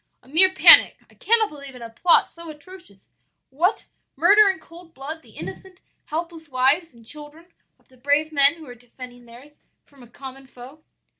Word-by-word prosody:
'A 255 - -22
mere 370 +6 +4
panic. - - +6
I - - -23
cannot 445 -1 0
believe 280 -3 -7
in 245 - -12
a 230 - -10
plot 340 +9 +3
so 335 -1 -13
atrocious. 310 - -15 0.4
What! 345 +10 -2 0.3
murder 400 +7 +4
in 380 - -3
cold 335 -1 -18
blood 300 +4 -7
the - - -21
innocent, 380 -1 -11 0.3
helpless 325 0 -8
wives 275 +6 0
and 235 -2 -21
children 300 +6 -12 0.2
of - - -37
the 260 - -24
brave 285 +4 -1
men 280 +1 +3
who 325 -2 -15
are 250 - -12
defending 245 +1 -15
theirs 255 +6 -18 0.3
from 280 -2 -23
a 240 - -16
common 265 +2 -13
foe? 260 +5 -16
295 Hz, 180 wpm, -21 LUFS, 260-335 Hz, 0.4 s, panic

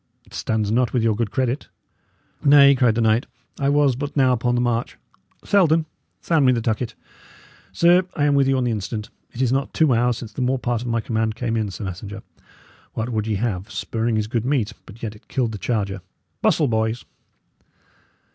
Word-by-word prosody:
It - - -21
stands 110 -2 -1
not 120 +2 +1
with 120 -3 +1
your 115 -2 +2
good 115 -1 -1
credit." 130 +4 -1 0.8
"Nay," 140 -1 +7
cried 125 -4 +2
the 115 - +1
knight, 110 +1 +2 0.3
"I 140 -1 +1
was 145 -3 +3
but 145 +3 -5
now 130 -2 +4
upon 120 0 0
the - - +1
march. 120 -1 -1 0.5
Selden, 165 -5 +3 0.4
sound 160 -4 +2
me 130 - +5
the 120 - +1
tucket. 115 +1 -2 0.8
Sir, 175 +2 +4
I 145 - 0
am 145 - +3
with 140 -1 +3
you 135 0 +2
on 130 - 0
the 120 - 0
instant. 105 0 -4 0.2
It 125 - -2
is 125 - +1
not 135 +1 -1
two 155 -5 +4
hours 120 0 +2
since 115 -3 -9
the - - -4
more 130 +1 +1
part 120 -1 -2
of 125 - -6
my 115 -1 0
command 110 -1 -1
came 115 -1 -2
in, 110 -2 -1
sir 95 +3 -7
messenger. 100 +2 -7 0.7
What 115 +2 -3
would 110 -2 -2
ye 110 - 0
have? 100 -1 -3
Spurring 115 0 -2
is 105 - 0
good 110 +1 -2
meat, 130 -5 0
but 110 +4 -13
yet 110 -1 -4
it 105 - -19
killed 125 -4 -1
the 105 - -6
charger. 100 -5 -2 0.4
Bustle, 150 - +3
boys!" 110 0 -1
120 Hz, 205 wpm, -22 LUFS, 110-135 Hz, 0.8 s, Nay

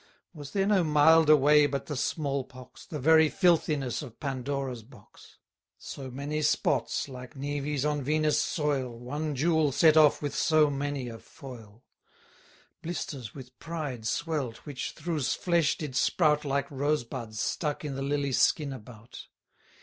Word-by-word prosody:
Was 145 -4 -9
there 195 +5 0
no 200 -3 +3
milder 155 0 +6
way 150 +1 +5
but 140 -1 -4
the 150 - -5
small 140 0 -1
pox, 130 0 -14
The 155 - -5
very 160 +2 +5
filthiness 155 - +1
of 125 -6 -11
Pandora's 135 -3 -3
box? 110 -3 -18 0.4
So 135 -2 -8
many 140 +4 -4
spots, 150 0 0
like 125 +1 -10
næves 145 +1 -2
on 150 -1 -1
Venus' 155 +2 +1
soil, 135 -6 -1
One 145 +5 -4
jewel 160 +1 +2
set 155 +3 +5
off 155 -2 +5
with 145 -2 -4
so 155 -2 +3
many 140 -2 -3
a 115 -1 -8
foil; 120 -7 -13 1.0
Blisters 145 -8 -6
with 130 -2 -12
pride 145 -9 -5
swell'd, 145 -5 -2
which 145 -4 -5
through's 155 -7 -2
flesh 170 -4 +1
did 145 -5 -6
sprout 150 +1 +2
Like 140 +1 -1
rose 145 +1 0
buds, 115 -3 -7
stuck 150 +3 -2
i' - - -3
th' 135 0 -4
lily 140 0 -1
skin 140 +2 +2
about. 115 -2 -12
145 Hz, 150 wpm, -28 LUFS, 130-155 Hz, 1.0 s, milder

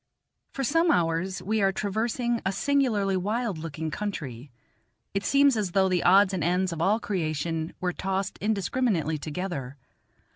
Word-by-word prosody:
For 275 - -3
some 330 +6 +2
hours 180 - +1
we 215 +2 0
are 195 -1 +3
traversing 225 +4 -1
a 190 - 0
singularly 220 -6 +1
wild 210 0 -1
looking 160 0 -5
country; 150 - -5 0.6
it 195 0 -1
seems 280 +2 +4
as 200 -5 -2
though 190 -1 +4
the 180 -2 +1
odds 195 +2 +5
and 180 -4 -1
ends 180 +2 +1
of 160 - -5
all 205 +6 +3
creation 165 -5 -2
were 180 -1 -1
tossed 195 +1 -3
indiscriminately 200 - 0
together. 145 -4 -5
190 Hz, 150 wpm, -27 LUFS, 165-215 Hz, 0.6 s, odds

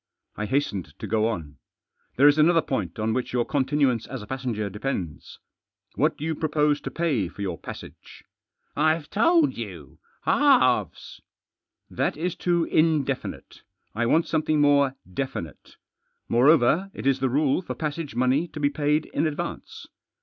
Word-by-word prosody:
I 105 - -3
hastened 100 - -2
to - - -6
go 110 0 +1
on. 80 -10 -5 0.3
" - - -46
There 140 +3 +6
is 145 +1 +5
another 165 +1 +4
point 100 -11 -3
on 110 +1 -1
which 125 0 -3
your 120 -2 +1
continuance 135 -4 +1
as 125 -5 -6
a - - -9
passenger 120 -4 -3
depends. 100 - -5 0.6
What - - +1
do 150 - -5
you 160 - 0
propose 150 -1 +1
to - - -5
pay 150 - 0
for 100 +3 -8
your 90 -4 -4
passage? - - -11 0.2
" - - -65
" - - -45 0.2
I've 160 -2 -4
told 320 - +3
you - - -8
— - - -36
halves." 280 -3 +2 0.3
" - - -59
That - - 0
is 175 +3 -2
too 175 -1 +1
indefinite. 155 -5 -1 0.3
I 115 +2 0
want 165 +7 +3
something 155 -1 0
more 140 -2 +3 0.2
definite. 90 - -6 0.5
Moreover, 150 +8 +4
it - - -7
is 135 -1 +2
the 130 0 +1
rule 140 +4 +1
for 180 - -6
passage 155 -3 -4
money 130 +7 +2
to 155 - -9
be 145 -1 +1
paid 150 +1 0
in 155 +3 -1
advance." 150 - -6
140 Hz, 170 wpm, -25 LUFS, 120-155 Hz, 0.6 s, There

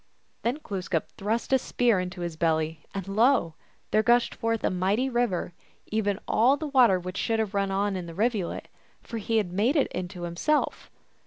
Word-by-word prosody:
Then 240 +5 0
Glooskap 185 -5 -2
thrust 225 +6 -2
a 265 - +5
spear 235 -5 +2
into 180 0 -5
his 170 -2 -3
belly, 160 -1 0
and 195 -1 -5
lo! 215 - +3 0.4
there 215 - +4
gushed 240 +1 +3
forth 230 -1 -1
a - - +2
mighty 195 +8 +1
river; 235 -8 0 0.4
even 205 -2 0
all 255 +6 +4
the 310 - -4
water 250 -10 +4
which 185 +2 -6
should 225 - 0
have 220 -2 -1
run 200 -1 +1
on 200 +1 0
while 190 - -2
in 175 - -7
the 165 - -9
rivulet, 210 -3 -1 0.4
for 230 - -5
he 225 +2 0
had 190 -5 0
made 225 - +2
it 285 - +2
into 180 0 -5
himself. 175 - -1
205 Hz, 190 wpm, -27 LUFS, 180-235 Hz, 0.4 s, a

